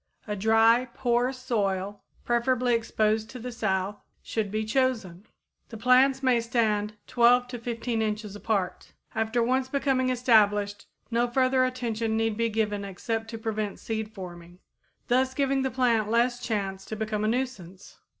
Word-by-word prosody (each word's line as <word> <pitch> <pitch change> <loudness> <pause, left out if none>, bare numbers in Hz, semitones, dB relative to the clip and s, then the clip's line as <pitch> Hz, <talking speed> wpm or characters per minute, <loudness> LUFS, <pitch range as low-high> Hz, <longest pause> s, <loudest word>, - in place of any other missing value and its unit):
A 210 - -3
dry, 225 +4 +4
poor 245 0 +1
soil, 205 -6 -2 0.2
preferably 245 +1 +1
exposed 220 -1 0
to 255 - -8
the 250 +1 -6
south, 200 -3 -2 0.2
should 220 -3 -2
be 215 +2 -2
chosen. 220 -6 -1 0.4
The 225 - -8
plants 260 +3 +4
may 250 -3 +3
stand 215 -3 0
12 245 +1 +4
to 245 -1 -6
15 230 0 -2
inches 210 -1 -3
apart. 205 -3 -2 0.2
After 225 +2 0
once 260 +2 0
becoming 265 -2 +1
established 210 -5 +2 0.2
no 235 +1 +2
further 255 +1 +2
attention 230 -3 -2
need 225 -1 0
be 230 +1 0
given 210 -2 -1
except 225 +4 -4
to 225 - -5
prevent 215 -2 -3
seed 220 -1 -4
forming, 175 -3 -10 0.5
thus 260 +1 +2
giving 275 -1 +1
the 265 - 0
plant 235 -4 +1
less 240 +2 +2
chance 195 -5 -3
to 220 - -5
become 215 -1 -2
a - - +1
nuisance. 215 -7 -4
225 Hz, 150 wpm, -27 LUFS, 210-250 Hz, 0.5 s, dry